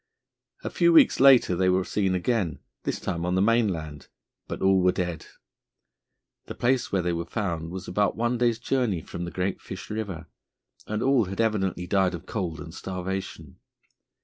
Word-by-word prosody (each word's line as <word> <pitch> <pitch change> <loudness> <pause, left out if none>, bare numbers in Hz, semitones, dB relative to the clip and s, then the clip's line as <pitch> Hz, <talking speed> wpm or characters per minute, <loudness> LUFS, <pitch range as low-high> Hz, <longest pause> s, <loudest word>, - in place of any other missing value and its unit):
A - - -4
few 345 - +3
weeks 315 -5 +6
later 130 -8 +6
they 95 +1 +2
were 90 +1 +2
seen 95 -1 0
again, 90 -3 0 0.3
this - - -2
time 85 0 -3
on 90 +1 0
the - - +2
mainland, 90 - 0 0.4
but - - -5
all 95 0 +3
were 90 0 +4
dead. 90 -3 -4 1.2
The - - -7
place 125 +1 +1
where 95 -2 +1
they 90 0 0
were 85 0 -2
found 85 -6 -3
was 95 +1 -7
about 100 +3 +1
one 120 +1 0
day's 120 -2 +2
journey 120 -7 0
from 85 - -6
the - - -5
Great 95 +1 -2
Fish - - -8
River, 100 -6 -4 0.6
and 110 +1 -2
all 130 -4 +3
had 95 +1 -7
evidently 100 -5 0
died 95 -1 +1
of 85 - -10
cold 90 -8 -4
and 80 -1 -9
starvation. 95 -5 -6
95 Hz, 175 wpm, -26 LUFS, 90-110 Hz, 1.2 s, weeks